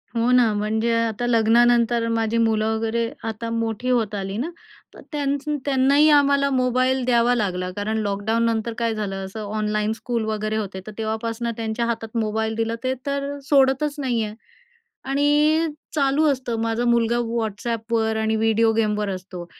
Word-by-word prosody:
हो 230 +1 +1
ना, 240 -4 +4
म्हणजे 220 +3 0
आता 225 +1 -3
लग्नानंतर 235 0 +3
माझी 225 0 0
मुलं 220 -1 +2
वगैरे 225 +1 -1 0.2
आता 225 +1 -4
मोठी 230 +1 -2
होत 230 -4 +1
आली 195 +1 -4
ना, 285 +8 -2 0.4
तर - - -13
त्यांचं 290 0 -1
त्यांनाही 280 +2 +4
आम्हाला 280 -1 +4
मोबाईल 255 0 +1
द्यावा 240 -1 +3
लागला. 185 -5 -1
कारण 215 +2 -1
लॉकडाऊननंतर 220 +3 0
काय 230 -1 0
झालं 195 -2 -4
असं 210 +3 -7
ऑनलाईन 215 0 0
स्कूल 230 -1 -3
वगैरे 215 0 -2
होते, 200 -3 -4
तर - - -6
तेव्हापासून 225 +1 -3
त्यांच्या 225 +1 -2
हातात 230 -1 -3
मोबाईल 220 0 -1
दिलं, 225 0 -1
ते 260 0 0
तर 280 0 -2
सोडतच 275 +1 +3
नाही 245 -5 0
आहे. 210 0 -6 0.7
आणि 295 +3 +3 0.3
चालू 280 +1 +2
असतं, 255 -3 -3
माझा 230 +1 -1
मुलगा 235 0 +2
WhatsAppवर 225 0 -2
आणि 220 0 +1
व्हिडिओ 225 0 +3
गेमवर 210 -2 0
असतो 185 -2 -6
230 Hz, 155 wpm, -22 LUFS, 220-250 Hz, 0.7 s, ना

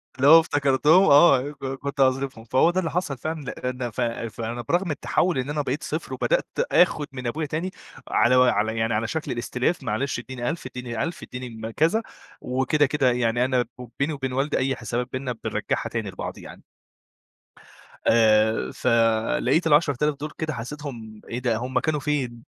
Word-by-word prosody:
اللي 135 +1 +2
هو 160 +2 +10
افتكرتهم 150 +3 +3
آه 140 -3 +6
ك 145 - -16
كنت 135 +1 -5
هاصرفهم 130 -3 +1
فهو 130 +7 +3
ده 185 - 0
اللي 165 - -2
حصل 155 -7 -2
فعلًا 155 +4 -4
لإن 125 -2 -4
ف 125 - -4
فأنا 115 0 -3
برغم 175 +8 0
التَحوّل 165 +2 0
إن 130 +3 -3
أنا 150 0 -1
بقيت 140 +1 -3
صفر 155 +2 -4
وبدأت - - 0 0.2
اخُد 155 -4 +3
من 125 -2 -5
أبويا 155 +6 -2
تاني 165 +6 -3 0.4
على 125 +2 +3
وعلى 115 -3 +3
يعني 115 0 0
على 110 +1 0
شكل 160 +3 -3
الإستلاف 125 +6 -1
معلش 125 +3 -2
ادّيني 125 0 -4
1000 165 -5 -5
ادّيني 125 -2 -4
1000 165 0 -5
اديني 125 -1 -7
م 110 0 -7
كذا، 165 - +1 0.4
وكده 130 +4 +1
كده 135 -2 +2
يعني 120 0 +1
أنا 130 -2 +1
بو 125 -2 -9
بيني 145 +3 0
وبين 135 -3 -4
والدي 140 +3 0
أي 135 0 0
حسابات 120 +1 -3
بيننا 130 -2 -3
بنرجّعها - - -2
تاني - - -3
لبعض - - -6
يعني. - - -12 1.4
آآ 110 -1 +3
فلقيت 115 - +2
ال10000 150 -1 +3
دُول 150 +1 -5
كده 155 0 -2
حسّيتهم 120 -4 -7
إيه 120 - -3
ده 120 -3 0
هُم 130 +2 -1
كانوا 155 0 -1
فين؟ 130 -5 -2
130 Hz, 175 wpm, -24 LUFS, 120-150 Hz, 1.4 s, هو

